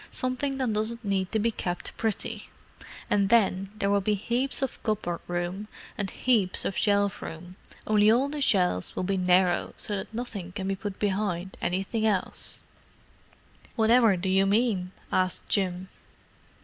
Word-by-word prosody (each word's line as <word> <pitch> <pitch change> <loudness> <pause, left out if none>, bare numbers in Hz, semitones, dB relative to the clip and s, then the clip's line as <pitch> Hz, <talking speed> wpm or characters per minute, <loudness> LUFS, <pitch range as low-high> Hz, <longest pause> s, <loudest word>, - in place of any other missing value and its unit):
Something 255 +2 -2
that 255 -5 0
doesn't 220 +2 -2
need 190 -2 0
to 220 - +1
be 225 +2 +1
kept 175 -4 -4
pretty. 220 -2 -3 0.6
And 200 -1 +2
then 195 -4 +3
there 200 -1 +1
will 200 0 +3
be 210 +2 +1
heaps 245 +7 -1
of 270 - -3
cupboard 195 -6 -1
room 175 +4 -3 0.3
and 200 -2 -2
heaps 215 -7 +1
of 195 - -1
shelf 200 -1 +2
room—only 185 +5 -1
all 250 +5 +3
the 295 0 -4
shelves 180 - +1
will - - -1
be 195 +2 0
narrow, 180 -1 +2
so 205 - -3
that 190 - -6
nothing 215 -6 -5
can 190 0 -4
be 195 - 0
put 200 0 -6
behind 195 -3 -1
anything 195 +5 -1
else." 200 -4 0 1.1
"Whatever 225 -2 +5
do 185 +2 -3
you 190 +1 +3
mean?" 200 -4 +1 0.2
asked 185 -1 +1
Jim. 185 -2 0
200 Hz, 155 wpm, -27 LUFS, 185-220 Hz, 1.1 s, Whatever